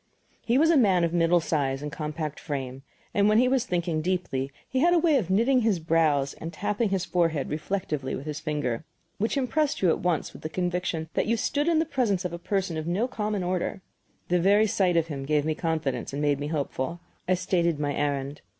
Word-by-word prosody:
He 240 +2 +2
was 320 +3 +5
a 330 - +5
man 190 -8 +4
of 170 0 0
middle 170 0 +4
size 140 -4 -1
and 150 - -4
compact 150 -1 -4
frame, 135 -3 -5 0.3
and 205 0 +3
when 215 - +4
he 250 +2 +5
was 255 -1 +2
thinking 170 -5 -1
deeply 155 -7 -2 0.2
he 260 - -1
had 345 +5 +4
a - - +5
way 320 -3 +4
of 215 -10 -1
kniting 235 +7 +3
his 220 -4 +2
brows 155 -4 +2
and 165 - -5
tapping 205 +5 -1
his 190 -2 0
forehead 165 -6 0
reflectively 150 -4 -2
with 135 - -7
his 150 -1 -4
finger, 150 -5 -2 0.4
which 220 +7 0
impressed 285 0 0
you 180 - +5
at - - +2
once 175 -4 -1
with - - -12
the 155 - -4
conviction 175 -2 -2
that - - 0
you 230 +1 +2
stood 290 +7 0
in 335 -2 +3
the 320 - +2
presence 235 - 0
of 175 - -3
a 170 - -5
person 185 -2 -1
of 155 +1 -4
no 195 +8 +1
common 210 -5 -2
order. 185 +1 -2 0.5
The 180 0 +3
very 200 +4 +4
sight 195 -5 +2
of 165 - +3
him 145 -4 -5
gave 150 +1 +1
me 155 - +1
confidence 155 -7 -2
and 140 - -3
made 145 -1 +1
me 145 - -3
hopeful. 150 +1 -3 0.3
I 185 - +3
stated 175 -3 0
my 145 -1 -1
errand. 140 0 -2
175 Hz, 225 wpm, -26 LUFS, 150-205 Hz, 0.5 s, was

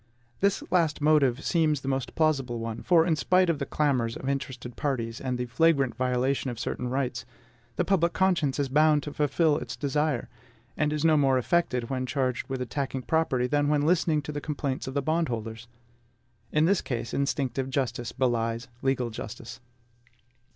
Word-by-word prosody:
This 200 0 +1
last 165 -4 +2
motive 145 -3 +3
seems 155 -5 +2
the 135 - -8
most 135 -1 -2
plausible 135 -7 +1
one; 115 0 -5
for 165 -2 +4
in 165 -2 +2
spite 180 +6 +3
of 155 - -4
the 140 - -3
clamors 125 -6 0
of 130 - -7
interested 130 -3 -4
parties, 115 -5 -2
and 130 -2 -2
the 125 - -2
flagrant 140 +1 +2
violation 130 +1 0
of 120 - -5
certain 125 - -3
rights, 125 -2 -2 0.5
the - - 0
public 170 -3 +2
conscience 175 -8 +1
is 140 -1 0
bound 150 +2 +3
to 145 - -6
fulfil 150 +1 +2
its - - -6
desire, 150 -2 -1 0.5
and 150 -1 0
is 150 +1 -1
no 160 -1 +5
more 135 -2 +3
affected 125 -3 0
when 130 -1 -2
charged 130 -2 -1
with 130 -1 -2
attacking 135 +1 -3
property, 150 -6 +1
than 145 +3 +1
when 145 -1 +2
listening 160 -2 +2
to 150 - -5
the 145 0 -4
complaints 140 -4 -3
of 130 - -5
the 140 - 0
bondholders. 120 -8 -2 0.8
In 155 +1 +3
this 195 +2 +3
case, 120 -3 -4
instinctive 135 -2 -1
justice 130 -3 -2
belies 120 -1 -1
legal 130 -3 0
justice. 110 +1 -8
135 Hz, 175 wpm, -27 LUFS, 125-155 Hz, 0.8 s, no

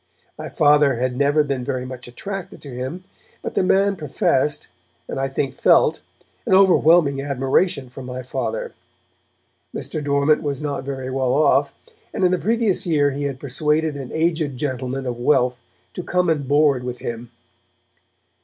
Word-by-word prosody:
My - - -7
Father 145 -2 +4
had 125 +1 -1
never 145 +3 +3
been 140 -3 -3
very 125 0 -3
much 130 -1 -8
attracted 195 +10 -7
to 140 - -9
him, 130 +9 -5 0.4
but - - -4
the - - +2
man 195 +2 +2
professed, 150 - 0 0.4
and - - -4
I 135 - 0
think 135 0 -2
felt, - - +3 0.5
an 190 - +4
overwhelming 170 -6 +5
admiration 140 +2 0
for 125 +2 -10
my 125 0 -6
Father. - - -4 1.0
Mr. 155 -2 -4
Dormant 140 +1 +2
was 145 -3 -3
not 145 -3 -3
very 130 -1 -4
well 130 -1 0
off, 140 -1 +3 0.4
and - - -1
in 180 - +3
the 185 - +1
previous 225 -3 +1
year 145 -4 +2
he 145 +1 -3
had 135 -2 -4
persuaded 150 +3 0
an 135 -3 -6
aged 160 -4 0
gentleman 130 -1 -3
of 120 -1 -4
wealth 125 -1 +2 0.3
to - - -5
come 180 0 0
and 145 -4 -2
board 145 -3 +3
with 125 0 -5
him. 120 0 -6
140 Hz, 165 wpm, -21 LUFS, 130-160 Hz, 1.0 s, overwhelming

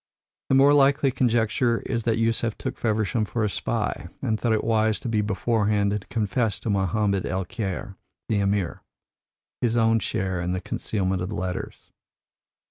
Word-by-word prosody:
The 135 - +4
more 140 +2 +6
likely 140 0 +4
conjecture 120 0 +1
is 115 -3 -2
that 115 -1 +2
Yusef 115 0 0
took - - -4
Feversham 110 0 0
for 110 +2 -2
a 105 - +1
spy, - - -2
and 110 -1 -1
thought 120 - 0
it 110 - +1
wise 110 -1 +2
to - - -5
be 110 -2 +1
beforehand 105 -1 +1
and 105 - -2
to - - -19
confess 110 0 0
to 110 - -1
Mohammed 100 0 +1
el 95 0 -2
Kheir, 100 -2 -5 0.3
the 105 -2 +1
Emir, 100 -3 0 0.8
his 120 -1 +1
own 115 0 +4
share 95 -4 -2
in 90 +1 -1
the 90 - -1
concealment 95 -1 -2
of 90 - -3
the 105 - -4
letters. 90 +1 -5
110 Hz, 175 wpm, -25 LUFS, 100-115 Hz, 0.8 s, more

